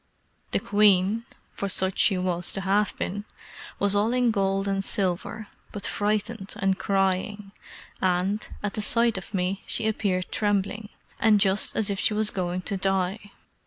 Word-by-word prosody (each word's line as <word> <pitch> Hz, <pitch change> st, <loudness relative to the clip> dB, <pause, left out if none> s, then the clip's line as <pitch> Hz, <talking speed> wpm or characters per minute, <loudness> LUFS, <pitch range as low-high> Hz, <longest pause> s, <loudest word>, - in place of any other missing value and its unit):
The -, -, 0 dB
queen 205 Hz, +2 st, +3 dB, 0.3 s
(for 200 Hz, -, -3 dB
such 190 Hz, 0 st, 0 dB
she 195 Hz, -, +4 dB
was 180 Hz, -1 st, 0 dB
to 195 Hz, -, 0 dB
have 200 Hz, +1 st, +1 dB
been) 205 Hz, +2 st, -3 dB, 0.5 s
was 200 Hz, -1 st, +2 dB
all 210 Hz, +3 st, +1 dB
in 250 Hz, -2 st, +2 dB
gold 195 Hz, -1 st, 0 dB
and 195 Hz, 0 st, -1 dB
silver, 195 Hz, +3 st, 0 dB, 0.2 s
but 205 Hz, -, -5 dB
frightened 210 Hz, 0 st, -2 dB
and 195 Hz, -1 st, 0 dB
crying, 195 Hz, +1 st, -1 dB, 0.5 s
and, 185 Hz, +3 st, 0 dB, 0.2 s
at 205 Hz, -, -2 dB
the 215 Hz, -, -1 dB
sight 230 Hz, 0 st, +4 dB
of 190 Hz, -, -11 dB
me, 185 Hz, +1 st, -1 dB
she 220 Hz, -, -1 dB
appeared 195 Hz, -4 st, -1 dB
trembling, 205 Hz, 0 st, -1 dB, 0.3 s
and 215 Hz, -2 st, +4 dB
just 195 Hz, 0 st, +3 dB
as 215 Hz, -2 st, +3 dB
if 200 Hz, -, -3 dB
she 210 Hz, -, +1 dB
was 215 Hz, 0 st, +1 dB
going 180 Hz, -1 st, -3 dB
to 200 Hz, -, -1 dB
die. 195 Hz, +2 st, -1 dB
200 Hz, 160 wpm, -25 LUFS, 190-210 Hz, 0.5 s, she